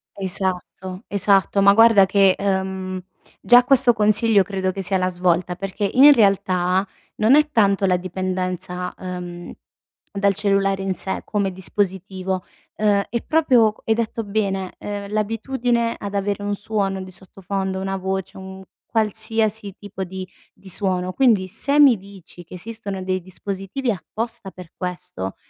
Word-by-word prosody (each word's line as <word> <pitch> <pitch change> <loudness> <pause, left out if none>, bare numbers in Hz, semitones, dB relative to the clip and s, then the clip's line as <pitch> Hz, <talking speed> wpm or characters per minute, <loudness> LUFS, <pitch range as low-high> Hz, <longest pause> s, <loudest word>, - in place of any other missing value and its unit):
Esatto. 190 0 -3
Esatto. 200 -1 +2
Ma, 200 0 +7
guarda 225 -2 +6
che, 195 -1 +4
uhm, 190 -1 -2 0.4
già 245 +1 +6
questo 255 -1 +5
consiglio 210 -1 +3
credo 190 -1 -2
che 195 +1 -5
sia 190 +1 0
la 185 0 0
svolta 180 0 0
perché, 195 +1 -3
in 285 +3 +8
realtà, 190 -4 +2 0.3
non 220 +5 +4
è 300 0 +4
tanto 200 -5 +3
la 180 -1 +3
dipendenza, 185 0 -4
uhm, 180 -1 -7 0.6
dal 200 0 +1
cellulare 195 -1 +1
in 190 -1 -1
sé, 190 - -2
come 200 -2 -1
dispositivo. 190 0 -3 0.3
Uhm, 205 -2 +2
è 235 - -3
proprio, 250 -9 +3
hai 225 - +3
detto 230 0 -2
bene, 195 -3 -2
uhm, 205 -1 -5
l'abitudine 230 +2 -1
ad 200 0 -6
avere 200 0 -1
un 205 0 -1
suono 200 -2 -2
di 185 - -11
sottofondo, 190 +1 -5
una 195 0 -3
voce, 190 0 -4
un 190 0 -9 0.3
qualsiasi 220 -2 -1
tipo 205 -2 -7
di 190 0 -7 0.3
di 195 - -18
suono. 185 -1 -1
Quindi, 220 -7 +3
se 280 +10 0
mi 280 -5 +7
dici 195 -3 -13
che 175 - -12
esistono 200 -1 -6
dei 185 0 -1
dispositivi 195 +7 -4
apposta 225 +2 -5
per 180 -3 -12
questo, 180 - -5
195 Hz, 145 wpm, -21 LUFS, 185-215 Hz, 0.6 s, in